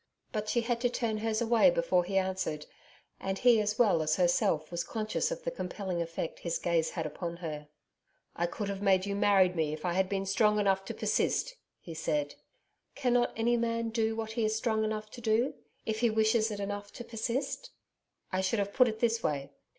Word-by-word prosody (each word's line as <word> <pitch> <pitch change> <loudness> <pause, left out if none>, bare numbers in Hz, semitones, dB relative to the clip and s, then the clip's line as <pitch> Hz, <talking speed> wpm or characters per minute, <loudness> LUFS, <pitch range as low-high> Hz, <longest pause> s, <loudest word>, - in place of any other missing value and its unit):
But 215 -2 -3
she 235 - +2
had 235 0 -1
to 245 - +3
turn 230 -3 -1
hers 220 0 -1
away 235 - +5
before - - +2
he 195 +2 -1
answered, 185 -5 -1 0.5
and 195 0 -2
he 240 -2 +5
as 210 +1 -1
well 205 -9 +4
as 155 0 +1
herself 175 -3 +2
was 170 0 -2
conscious 215 - -1
of - - -5
the - - -2
compelling 185 - -3
effect 165 0 -4
his 170 -1 -2
gaze 170 -2 +1
had 165 -3 -4
upon 170 +3 -5
her. 155 -4 -6 0.7
'I 170 - 0
could 200 +4 -4
have 200 -1 -4
made 190 -2 +3
you 200 0 -2
marry 195 -2 +5
me 160 -4 -1
if 155 +2 -6
I 175 - +1
had 190 +1 +1
been 195 -1 -1
strong 210 +2 +3
enough 195 -1 +2
to - - -5
persist,' - - 0 0.3
he 165 - -9
said. 150 -2 -1 0.6
'Cannot 245 -3 +2
any 235 +2 +2
man 230 0 -1
do 225 -1 0
what 220 -1 -4
he 225 0 -1
is 215 0 +1
strong 220 -1 0
enough 215 0 -3
to 240 - -9
do 225 +3 +2 0.3
if 220 0 -2
he 235 0 +3
wishes 220 +1 +2
it 210 -2 -5
enough 205 0 -4
to 240 - -7
persist?' 235 +4 -3 0.6
'I 185 - +1
should 190 +5 0
have 200 0 -1
put 255 -1 +5
it 220 -1 -4
this 230 -1 +2
way. 140 -1 -2
210 Hz, 210 wpm, -31 LUFS, 180-230 Hz, 0.7 s, away